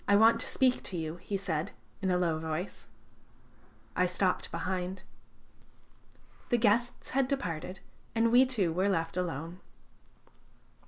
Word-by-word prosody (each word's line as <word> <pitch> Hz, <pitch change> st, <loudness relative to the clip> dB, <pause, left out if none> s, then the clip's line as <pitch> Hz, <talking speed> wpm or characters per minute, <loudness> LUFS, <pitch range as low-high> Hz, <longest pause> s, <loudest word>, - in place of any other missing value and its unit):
"I 205 Hz, -, +5 dB
want 225 Hz, +2 st, +6 dB
to -, -, +1 dB
speak 255 Hz, -1 st, +2 dB
to 185 Hz, -, -2 dB
you," 160 Hz, 0 st, -3 dB
he 195 Hz, +3 st, -3 dB
said 170 Hz, -2 st, -2 dB, 0.3 s
in 190 Hz, -, 0 dB
a 180 Hz, -, +3 dB
low 165 Hz, -3 st, +1 dB
voice. 160 Hz, -4 st, -4 dB, 1.1 s
I 180 Hz, -, +3 dB
stopped 185 Hz, +1 st, 0 dB
behind. 180 Hz, +2 st, -3 dB, 1.5 s
The 240 Hz, -, +4 dB
guests 235 Hz, +2 st, +1 dB
had 270 Hz, 0 st, +2 dB
departed, 185 Hz, -, -3 dB, 0.3 s
and 230 Hz, 0 st, +3 dB
we 255 Hz, +2 st, +7 dB
two 200 Hz, -10 st, +1 dB
were 190 Hz, +4 st, +2 dB
left 165 Hz, -3 st, 0 dB
alone. 170 Hz, -1 st, -3 dB
185 Hz, 140 wpm, -31 LUFS, 170-225 Hz, 1.5 s, we